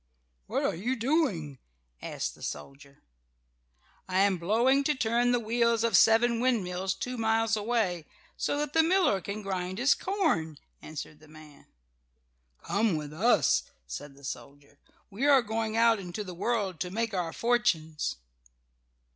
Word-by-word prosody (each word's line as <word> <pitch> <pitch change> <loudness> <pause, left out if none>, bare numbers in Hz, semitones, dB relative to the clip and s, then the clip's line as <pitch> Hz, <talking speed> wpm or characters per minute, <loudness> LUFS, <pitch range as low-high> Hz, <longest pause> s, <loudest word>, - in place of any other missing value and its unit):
"What - - -1
are - - +1
you 235 +10 -2
doing?" 225 - 0 0.4
asked - - -4
the - - -18
soldier. 140 - -8 1.1
"I 185 +1 +2
am 195 -2 +2
blowing 235 +10 +3
to 300 - +2
turn 240 0 +1
the 245 - +2
wheels 235 0 +1
of 230 -4 +2
seven 230 +4 +5
windmills 190 -7 0
two 250 +5 -5
miles 225 0 +2
away, 205 -7 -1 0.3
so - - -1
that 295 0 -2
the 325 - +5
miller 335 - +2
can 205 +3 -6
grind 185 -1 -3
his 265 +5 +4
corn," 315 - -1 0.2
answered 150 -1 -8
the 155 - -18
man. 155 -1 -16 1.0
"Come 205 -2 +1
with 150 -1 -5
us," 175 - +3 0.2
said 135 - -8
the 140 - -18
soldier. 145 +1 -9 0.3
"We 240 +9 -1
are 275 -3 +6
going 220 0 -2
out 230 -1 +4
into 190 +3 -5
the 185 -3 -8
world 200 -1 -1
to 180 - -2
make 225 +3 -2
our 175 -3 -1
fortunes." 210 -11 0
210 Hz, 150 wpm, -29 LUFS, 165-235 Hz, 1.1 s, are